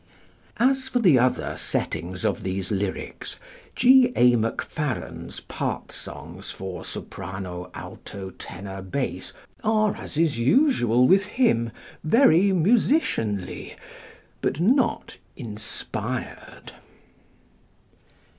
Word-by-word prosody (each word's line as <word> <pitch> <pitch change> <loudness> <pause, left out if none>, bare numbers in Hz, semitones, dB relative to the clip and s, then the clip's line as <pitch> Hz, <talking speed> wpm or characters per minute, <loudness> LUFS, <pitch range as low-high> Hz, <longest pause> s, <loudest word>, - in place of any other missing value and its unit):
As 265 +2 +2
for 255 - -1
the 175 - +5
other 125 +1 +1
settings 90 +1 -3
of - - 0
these 95 +1 -3
lyrics, 100 -1 -3 0.4
+G. 255 0 +6
A. 125 0 +6
Macfarren's+ 125 +4 -3
part - - -4
songs - - -8
for 95 -1 -6
S.A.T.B. - - -8 2.4
are, 215 -1 +2
as - - -7
is 155 -7 +2
usual 125 - +4
with 195 +2 +5
him, 155 - +2 0.3
very 200 - +5
musicianly 180 - +1 0.7
but 140 - -1
not 245 +8 +2 0.2
inspired. 110 -4 -6
155 Hz, 85 wpm, -25 LUFS, -, 2.4 s, +G